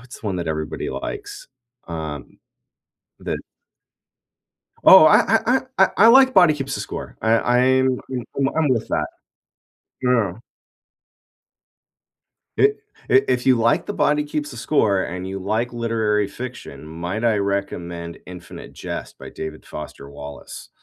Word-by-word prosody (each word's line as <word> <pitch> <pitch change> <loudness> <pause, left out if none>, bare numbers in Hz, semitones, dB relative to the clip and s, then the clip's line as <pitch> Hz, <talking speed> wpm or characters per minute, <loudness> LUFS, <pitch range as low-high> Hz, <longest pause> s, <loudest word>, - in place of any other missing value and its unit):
What's 125 +1 -13
one 100 -4 -2
that 85 -2 -3
everybody 80 -1 -3
likes, 415 +4 -7 0.4
um, 80 -4 -6 0.8
the - - -3 1.5
Oh, 190 -4 +9
I 195 +7 +5
I 250 +3 +3 0.2
I 190 - +7
I - - -4
I 225 - +7
like 260 +2 +7
Body 175 -5 +6
Keeps 135 -2 -4
the - - -4
Score. - - -7
I 110 - 0
I'm 130 +2 +2 0.4
I'm 135 -1 +2
I'm 160 -2 +2
with 115 -4 0
that. - - 0 0.9
Yeah. 115 -7 +1 2.2
I - - +1
i - - +9 0.4
if 130 -2 +3
you 130 - +5
like 115 +1 +2
The - - -4
Body 150 0 +2
Keeps 150 0 -4
the 120 - -9
Score, 105 -7 +1
and 90 +1 -5
you 95 0 -5
like 110 +5 -2
literary 110 -3 0
fiction, 120 - -8
might 85 +8 -5
I 115 -2 +3
recommend 90 -4 -3
Infinite 90 -1 -10
Jest - - -7
by - - -10
David 80 0 -8
Foster 75 -2 -9
Wallace. 70 -1 -10
115 Hz, 140 wpm, -21 LUFS, 90-135 Hz, 2.2 s, Oh